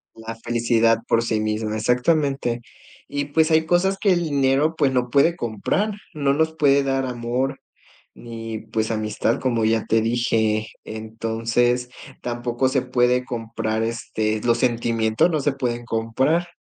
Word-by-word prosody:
La 115 0 -7
felicidad 115 0 +2
por 115 - +3
sí 115 -2 0
misma, 110 0 -2
exactamente. 125 +1 +1 0.5
Y, 145 0 -2
pues, 155 +3 +2
hay 160 0 +4
cosas 175 +4 +2
que 200 - +3
el 175 -1 +2
dinero, 140 +1 +2
pues, 140 -3 +3
no 125 -1 0
puede 140 +7 +3
comprar, 120 - -1 0.2
no 140 -3 +1
nos 160 +2 0
puede 140 -2 +4
dar 135 -1 0
amor, 125 +2 -2 0.5
ni, 115 -1 -7
pues, 110 0 -3
amistad, 110 +1 -1
como 120 -4 0
ya 110 0 +1
te 115 - +3
dije. 110 -2 +1 0.2
Entonces, 115 +2 -1 0.3
tampoco 120 +1 -1
se 130 -1 +1
puede 125 0 +2
comprar 115 -2 -3
este, 110 -1 -2
los 120 -1 +2
sentimientos 115 +2 +1
no 155 -3 0
se 145 +1 +1
pueden 120 -3 -3
comprar, 130 +10 0
120 Hz, 150 wpm, -22 LUFS, 115-140 Hz, 0.5 s, hay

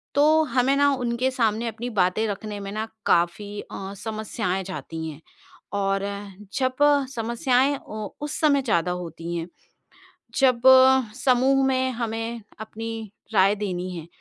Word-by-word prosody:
तो 310 +2 +5
हमें 265 +1 +3
उनके 255 -2 +1
सामने 230 -2 0
अपनी 230 +2 -4
बातें 185 +5 +2
रखने 205 0 -5
में 200 0 -6
ना 215 +2 -3 0.2
काफ़ी 200 +4 +1
अ, 195 0 -7
समस्याएँ 215 -4 -2
जाती 165 -3 -6
हैं 155 0 -10 0.5
और 195 -1 0 0.5
जब 255 -1 0 0.4
समस्याएँ 245 +4 +1
उ 215 -4 -7 0.2
उस 295 - -4
समय 285 -3 +4
ज़्यादा 180 -9 +1
होती 170 0 -6
हैं, 165 0 -3 0.9
जब 255 -3 +4 0.6
समूह 265 +1 +3
में 260 -1 +1
हमें 225 0 -3 0.2
अपनी 225 +1 -6 0.4
राय 195 0 +5
देनी 185 -3 -3
है 165 -2 -7
220 Hz, 130 wpm, -24 LUFS, 195-255 Hz, 0.9 s, तो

